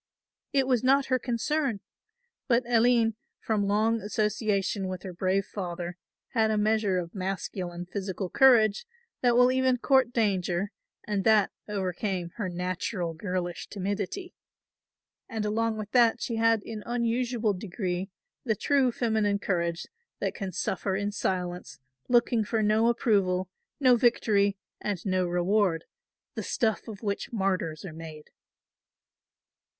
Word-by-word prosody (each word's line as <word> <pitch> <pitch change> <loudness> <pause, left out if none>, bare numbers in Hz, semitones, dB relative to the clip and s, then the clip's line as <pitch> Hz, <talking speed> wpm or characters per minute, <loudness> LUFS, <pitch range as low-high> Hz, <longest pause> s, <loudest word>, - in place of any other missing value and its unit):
It 275 -3 +3
was 255 -3 +1
not 270 +1 +4
her 255 - +3
concern. 245 0 -1 0.7
But 245 -2 +3
Aline 235 -1 +4 0.3
from 210 -3 0
long 220 +2 +2
association 210 -2 0
with 185 -1 -5
her 185 - -6
brave 190 +2 0
father 175 -2 -5 0.3
had 220 -2 +2
a 215 - +1
measure 210 -2 +2
of 170 -2 -4
masculine 185 -2 -4
physical 190 0 -4
courage 230 - +4 0.3
that 245 -2 +3
will 250 +1 +6
even 260 -1 +2
court 265 0 +3
danger 195 -4 0 0.3
and 205 -2 -1
that 215 -2 +4 0.2
overcame 190 -2 -2
her 205 -5 -2
natural 180 0 -3
girlish 175 0 -4
timidity, 205 - -4 1.0
and 220 -3 -3
along 220 +1 0
with 210 -1 -6
that 240 -1 +4
she 230 -1 -3
had 225 -2 +3
in 220 -2 -6
unusual 235 -2 0
degree 185 -1 -3 0.3
the 220 -4 +1
true 270 +3 +2
feminine 220 -4 +1
courage 170 -4 -1 0.3
that - - -2
can 195 -4 -5
suffer 190 +2 -1
in 205 +1 -1
silence 180 -3 -3 0.3
looking 240 -2 +3
for 220 +1 0
no 215 +2 +3
approval, 190 -6 +1 0.3
no 255 -3 +6
victory 205 -4 +2 0.2
and 200 -3 -3
no 185 -2 +1
reward, 180 -1 +1 0.5
the - - -4
stuff 220 -1 -1
of 215 -2 -8
which 200 -1 -2
martyrs 190 -7 -1
are 170 - -7
made. 155 -1 -10
210 Hz, 135 wpm, -28 LUFS, 185-230 Hz, 1.0 s, will